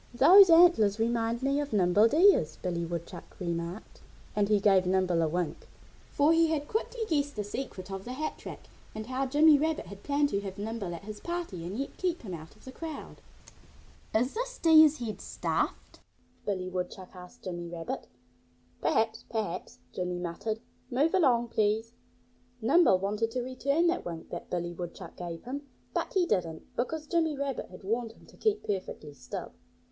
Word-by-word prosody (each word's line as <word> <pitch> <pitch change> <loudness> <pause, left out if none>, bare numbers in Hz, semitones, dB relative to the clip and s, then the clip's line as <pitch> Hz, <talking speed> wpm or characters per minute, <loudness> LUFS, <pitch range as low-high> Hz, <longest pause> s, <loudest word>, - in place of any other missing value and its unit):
"Those 380 +9 +9
antlers 330 - +6
remind 230 +1 0
me 275 +1 +2
of 290 -3 -3
Nimble 205 +2 +5
Deer's," 305 - +4
Billy 175 -2 -3
Woodchuck 170 +1 -7
remarked. 170 +2 -5 0.3
And 205 -1 +2
he 210 -1 +4
gave 195 -2 +4
Nimble 185 -2 +2
a 160 - +2
wink, 175 +1 -3 0.4
for 290 +3 +3
he 330 0 +4
had 300 -2 -1
quickly 460 +2 -2
guessed 290 -4 0
the 210 - -2
secret 205 -3 -6
of 195 0 -5
the 250 - -6
hat 310 +4 -4
rack - - -9 0.3
and 215 0 -5
how 260 +2 -2
Jimmy 295 +2 +6
Rabbit 315 +1 0
had 195 +2 -11
planned 285 +2 +1
to 200 - -1
have 195 -2 -7
Nimble 205 -4 -4
at 170 - -10
his 210 0 -8
party 340 - -4
and 185 +5 -5
yet 275 - -4
keep 355 -5 -1
him 190 -5 -6
out 160 +2 -9
of 215 - -21
the 260 - -8
crowd. 315 +2 -7 1.0
"Is 245 +4 +2
this - - -4
Deer's 315 -2 +7
head 230 -5 -5
stuffed?" - - -3 0.5
Billy 185 -3 -1
Woodchuck 185 +1 -5
asked 180 0 -13
Jimmy 175 -2 -5
Rabbit. 165 -1 -5 0.7
"Perhaps! 225 +1 +1
Perhaps!" 210 -6 -4 0.2
Jimmy 180 -1 -2
muttered. 180 +6 -4 0.3
"Move 280 +6 +2
along, 250 -10 +3
please!" 220 +1 0 0.7
Nimble 270 - +5
wanted 210 +4 -1
to 250 +1 -3
return 280 +6 0
that 345 +1 +1
wink 165 -2 -7
that 175 - -6
Billy 175 -1 -2
Woodchuck 175 0 -8
gave 170 -2 -6
him. 280 +3 -6 0.3
But - - -2
he 370 -2 +4
didn't, 165 - -2
because 305 +6 -2
Jimmy 320 -2 +1
Rabbit 275 -2 -3
had 180 - -12
warned 225 +3 -2
him - - -20
to - - -18
keep 430 -1 0
perfectly 185 -7 -4
still. 125 -3 -7
225 Hz, 175 wpm, -29 LUFS, 185-290 Hz, 1.0 s, Those